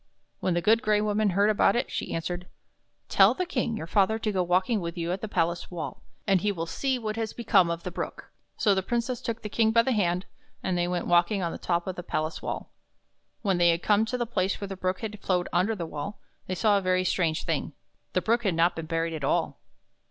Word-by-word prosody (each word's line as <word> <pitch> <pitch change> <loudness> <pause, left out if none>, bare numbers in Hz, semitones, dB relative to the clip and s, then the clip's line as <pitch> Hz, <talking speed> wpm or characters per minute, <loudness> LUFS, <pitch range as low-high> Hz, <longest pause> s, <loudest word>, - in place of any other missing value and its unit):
When 180 - 0
the 175 - 0
Good 225 +3 +4
Gray 215 -4 +2
Woman 210 0 +1
heard 200 +3 +3
about 205 -1 +3
it 240 - -1
she - - -3
answered: 175 +2 -3 0.3
" - - -47
Tell - - +7
the 365 - -1
King, 245 -8 -1
your 160 - -5
father, 200 +5 +2
to 220 -1 -1
go 190 -2 +1
walking 185 +5 +1
with 170 0 -5
you 170 0 -2
on 185 - -2
the 220 - -3
palace 170 -3 -1
wall, 175 -3 -6 0.2
and 195 -3 +3
he 210 - +1
will 165 -4 -3
see 265 +9 -1
what 215 -2 -4
has 225 -1 -2
become 195 -7 +3
of 170 0 -3
the 180 - -4
Brook." - - -6 0.3
So 205 - +3
the 190 - +1
Princess 240 +4 -2
took 230 0 -4
the - - -3
King 220 +1 +2
by 230 +1 +4
the 265 - 0
hand, 180 -5 +1 0.4
and 185 - 0
they 175 0 +1
went 175 -1 -2
walking 175 +3 +3
on 170 - -1
the - - -7
top 170 -1 0
of 185 - -4
the - - -3
palace 155 -2 -3
wall. - - -5 0.7
When 190 -4 +1
they 170 -1 +5
came 205 +5 +2
to 250 +3 -2
the 240 - -1
place 195 -4 -1
where 200 - -4
the 195 - -5
Brook 185 0 -2
had 215 -2 -5
flowed 180 -2 0
under 195 +6 +2
the 175 -4 -4
wall, 155 +6 -6 0.3
they 185 - -2
saw 205 +1 +3
a - - -6
very 185 0 +2
strange 170 -3 0
thing. - - -2 0.4
The - - +2
Brook 235 +2 +2
had 190 -6 +1
not 170 +2 +3
been 165 -1 -5
buried 165 0 -1
at 155 -3 -5
all! - - 0
190 Hz, 250 wpm, -27 LUFS, 175-215 Hz, 0.7 s, Tell